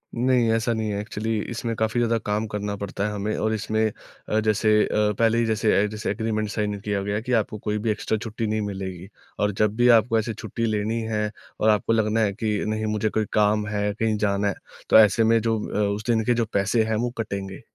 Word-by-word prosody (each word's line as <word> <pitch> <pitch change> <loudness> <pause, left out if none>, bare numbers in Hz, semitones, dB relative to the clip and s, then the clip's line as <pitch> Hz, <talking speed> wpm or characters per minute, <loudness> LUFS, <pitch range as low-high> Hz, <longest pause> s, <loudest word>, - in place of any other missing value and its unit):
नहीं, 120 -1 +2
ऐसा 115 +1 +1
नहीं 110 -1 -2
है, 100 - -2
एक्चुअली 110 +1 -3
इसमें 115 0 -3
काफ़ी 110 +2 0
ज़्यादा 115 -1 +2
काम 105 +1 0
करना 105 0 -3
पड़ता 100 0 -4
है - - -3
हमें 105 +1 -2
और 110 0 0
इसमें 110 0 0 0.4
अ, 110 - +2
जैसे 110 0 +1 0.2
अ, - - -6 0.3
पहले 115 0 +3
ही 115 - +2
जैसे 110 -1 +1
अ, - - +2
जैसे 110 +1 -4
एग्रीमेंट 110 -2 -2
साइन 105 -1 -2
किया 100 0 -2
गया 100 +1 -1
कि 125 +3 -5
आपको 105 - -7
कोई 105 0 -2
भी 110 +2 -2
एक्स्ट्रा 105 +1 -1
छुट्टी 110 0 -4
नहीं 110 0 -1
मिलेगी, 95 -3 -5 0.3
और 105 0 +2
जब 105 +1 0
भी 120 +2 +3
आपको 115 +1 0
ऐसे 110 +1 -3
छुट्टी 110 +2 -4
लेनी 110 +1 -1
है, 105 -1 -1 0.3
और 110 - +3
आपको 105 +1 +2
लगना 110 0 +1
है 105 -3 +2
कि 110 0 -1
नहीं, 110 0 -1
मुझे 110 0 0
कोई 110 0 0
काम 105 0 +2
है, 105 0 -1
कहीं 110 0 0
जाना 100 -1 +1
है, 100 - -1 0.3
तो - - +8
ऐसे 110 +1 +5
में 115 +1 +4
जो 115 0 0
अ, - - -3 0.2
उस 105 +2 -7
दिन 115 -1 +3
के 120 - +3
जो 115 -1 0
पैसे 100 +3 +2
हैं, 110 0 -1
वो 120 +3 0
कटेंगे। 100 -4 -4
110 Hz, 235 wpm, -24 LUFS, 105-115 Hz, 0.4 s, तो